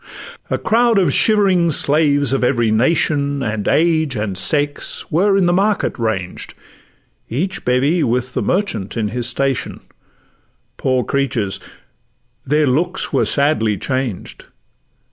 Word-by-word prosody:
A - - 0
crowd 230 0 +2
of 190 -3 +2
shivering 195 -6 +3
slaves 145 -2 +2
of 135 - 0
every 120 -3 +1
nation, 140 +3 +1
And 105 -2 -3
age, 160 -4 +1
and 105 -3 -3
sex, 145 +9 0
were 195 +5 +2
in 190 - +2
the 175 - +2
market 200 -5 0
ranged; 95 -6 -4 0.7
Each 175 +10 -3
bevy 140 +7 +1
with 125 +1 -1
the - - -1
merchant 125 - -2
in 110 -2 -1
his 120 +2 0
station: 135 +1 -2 1.0
Poor 130 -1 0
creatures! 120 -8 -2 0.8
their 150 +2 +1
good 130 - +1
looks 175 +6 -1
were - - +2
sadly 140 -8 +1
changed. 130 -4 -4
140 Hz, 130 wpm, -17 LUFS, 120-170 Hz, 1.0 s, shivering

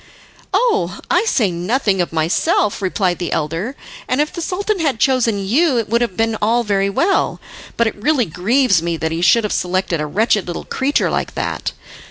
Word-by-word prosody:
"Oh, 205 - +1
I 360 +5 +3
say 225 - +2
nothing 190 +3 0
of 175 - -2
myself," 175 - +1
replied 185 -2 0
the 175 - -3
elder, 165 - -2 0.3
"and 255 - 0
if 300 +1 0
the 340 - -5
Sultan 400 +4 -2
had 285 -8 0
chosen 230 -7 +1
you 270 - +2
it 225 -3 -1
would 235 +2 +2
have 215 -7 -2
been 225 0 +1
all 230 +3 +2
very 200 -2 +1
well; 350 - +1 0.4
but 235 - +3
it 220 - -1
really 250 +4 +1
grieves 195 - +2
me 170 0 -2
that 160 0 -2
he 165 +1 -2
should 230 +6 +4
have 210 - -1
selected 180 -2 -1
a 150 - -2
wretched 210 +3 +1
little 175 - -5
creature 275 +2 0
like - - -2
that. - - -3
210 Hz, 195 wpm, -18 LUFS, 180-265 Hz, 0.4 s, should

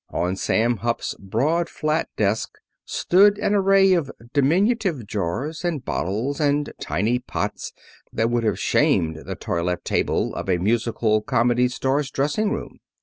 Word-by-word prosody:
On 90 +2 -1
Sam 115 +4 +1
Hupp's 120 +4 -2
broad 145 - 0
flat 155 +1 -1
desk 105 +1 0 0.3
stood 200 +3 +4
an 210 0 0
array 195 -1 +4
of 165 -6 0 0.2
diminutive 170 - +1
jars, 110 - -3
and 160 -7 -2
bottles, 110 +10 -2
and 145 -1 +1
tiny 115 +6 0
pots 125 - -4 0.4
that 115 +1 0
would 120 -1 +1
have 110 - 0
shamed 80 -1 +2
the - - -4
toilette 85 +1 -2
table - - 0
of - - -5
a 90 - +3
musical 110 +2 +1
comedy 120 +3 +2
star's 135 +3 -1
dressing 150 +11 0
room. - - -5
125 Hz, 145 wpm, -23 LUFS, 110-160 Hz, 0.4 s, stood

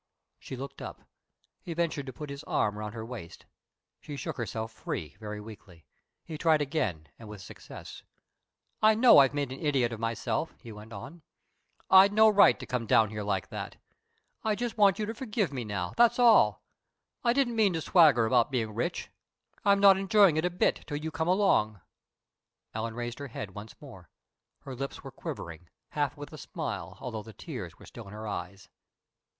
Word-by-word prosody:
She - - -8
looked 135 +2 -8
up. - - -8 0.6
He 170 - -6
ventured 160 -5 -1
to - - -4
put 150 +1 -8
his 140 0 -7
arm 105 -1 0
around 105 0 -5
her 110 -1 -6
waist. 115 -9 -9 0.5
She 145 - -8
shook - - -4
herself 115 -1 -4
free, 75 -9 -6
very 105 -1 -6
weakly. 100 -6 -13 0.4
He 155 -2 -7
tried 160 -2 +4
again 110 - -2
and 110 -2 -11
with 105 -1 -9
success. - - -11 0.8
"I 215 0 +6
know 230 - +8
I've 135 0 +4
made 140 -3 -2
an 135 - -7
idiot 135 -6 +1
of 115 - -7
myself," 115 0 -2
he 115 - -11
went 105 +1 -11
on. 115 - -9 0.7
"I'd 190 +2 +8
no 220 +1 +7
right 205 -1 +6
to - - -7
come 125 -3 -3
down 110 0 +4
here 105 -1 -4
like 100 -2 -2
that. - - -6 0.7
I 215 -1 +1
just 240 +1 -3
want 200 -3 +4
you 215 - -1
to 225 - -4
forgive 215 - -2
me 125 -3 -3
now, 100 -4 -4
that's 240 0 +4
all. 220 - +5 0.6
I 235 - +4
didn't 245 -2 +1
mean 210 -4 +3
to 165 - -2
swagger 150 -10 +5
about 120 0 +3
being 115 -5 -2
rich. 120 +11 -3 0.5
I'm 200 -2 +4
not 200 -1 +7
enjoying 195 -3 +5
it 155 +2 +1
a - - +2
bit 180 +1 +1
till 145 - -3
you 160 +2 -5
come 160 +2 -2
along." 180 - +2 0.9
Ellen 110 0 -4
raised 120 +1 -5
her 140 - -5
head 105 -5 -7
once 105 +2 -10
more. 95 - -13 0.5
Her 135 - -8
lips 135 +2 -6
were' - - -8
quivering, 85 0 -8 0.2
half - - -2
with - - -9
a - - -9
smile, 90 +3 -5
although 115 -4 -5
the 110 +1 -12
tears - - -8
were - - -15
still - - -11
in 100 - -11
her 110 +1 -7
eyes. 100 0 -6
130 Hz, 190 wpm, -29 LUFS, 105-180 Hz, 0.9 s, know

